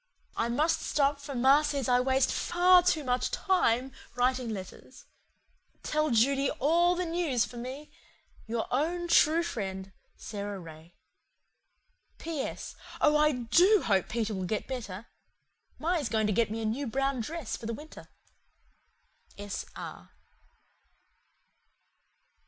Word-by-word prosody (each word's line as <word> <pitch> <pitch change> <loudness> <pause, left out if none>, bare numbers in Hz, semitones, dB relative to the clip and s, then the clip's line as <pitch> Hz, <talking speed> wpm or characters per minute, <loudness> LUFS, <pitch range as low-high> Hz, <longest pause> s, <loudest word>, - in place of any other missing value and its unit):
I 230 - -1
must 305 +7 +1
stop 280 -1 +1
for 280 -1 -7
ma 265 +4 +5
says 285 -4 -2
I 250 -1 +4
waste 265 +1 +2
FAR 360 +1 +4
TOO 345 -4 +1
MUCH 250 -1 0
TIME 270 - +1 0.2
writing 250 0 +1
letters. 190 -4 -9 0.8
Tell 305 0 0
Judy 270 +4 +3
ALL 340 +5 +3
THE 360 0 -2
NEWS 325 -8 0
for 245 - -11
me. 260 +5 -7 0.6
"Your 225 0 -2
OWN 340 +6 0
TRUE 335 0 +4
FRIEND, 195 - -5 0.3
"SARA 205 -1 -6
RAY. 165 0 -13 1.2
"P.S. 315 -4 -5 0.2
Oh 300 0 +4
I 300 0 +4
DO 330 - +4
hope 195 -4 +1
Peter 220 -1 -2
will 190 -2 -3
get 210 +4 -2
better. 225 -6 -6 0.7
Ma 335 +3 -1
is 285 -7 -2
going 220 -1 +1
to 210 - +1
get 230 +1 +2
me 225 +1 -4
a - - -2
new 250 +6 -2
brown 270 +2 -1
dress 300 +1 -4
for 225 - -8
the 230 - -2
winter. 305 +4 -12 1.3
"S. 205 -1 -5
R." - - -9
260 Hz, 135 wpm, -29 LUFS, 225-305 Hz, 1.3 s, ma